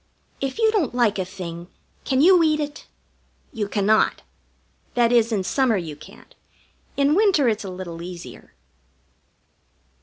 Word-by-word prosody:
If 270 +5 -3
you 445 -1 +3
don't 330 - 0
like 230 -5 +2
a - - 0
thing, 175 -2 -8 0.4
can 265 -1 +1
you 360 +2 +6
eat 310 -1 +2
it? 295 0 -6 0.7
You 215 -4 -3
cannot. 210 +1 +1 0.7
That 240 -1 +3
is, 230 -1 +3
in 200 -4 0
summer 245 +2 +1
you 160 -5 -5
can't. - - -16 0.6
In 280 +1 +3
winter 375 - +3
it's 220 -2 0
a 195 - -6
little 180 -2 -7
easier. 175 0 -10
230 Hz, 145 wpm, -22 LUFS, 190-290 Hz, 0.7 s, you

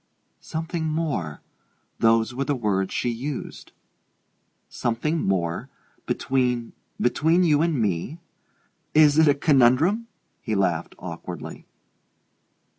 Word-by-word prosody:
"Something 160 0 -4
more 150 - -2 0.6
those 115 +1 +3
were 135 +2 -2
the 145 - 0
words 100 -5 -1
she 120 - -1
used." 125 +4 -5 1.0
"Something 150 +8 -1
more? 85 -3 -1 0.4
Between 125 -3 0 0.3
between 160 +8 +2
you 150 -3 +3
and 165 -5 +1
me? 105 - -1 0.8
Is 150 -1 +6
it 160 - +6
a 145 - +5
conundrum?" 150 - +3 0.3
He 110 - -2
laughed 90 -4 0
awkwardly. - - -8
130 Hz, 105 wpm, -24 LUFS, 110-155 Hz, 1.0 s, Is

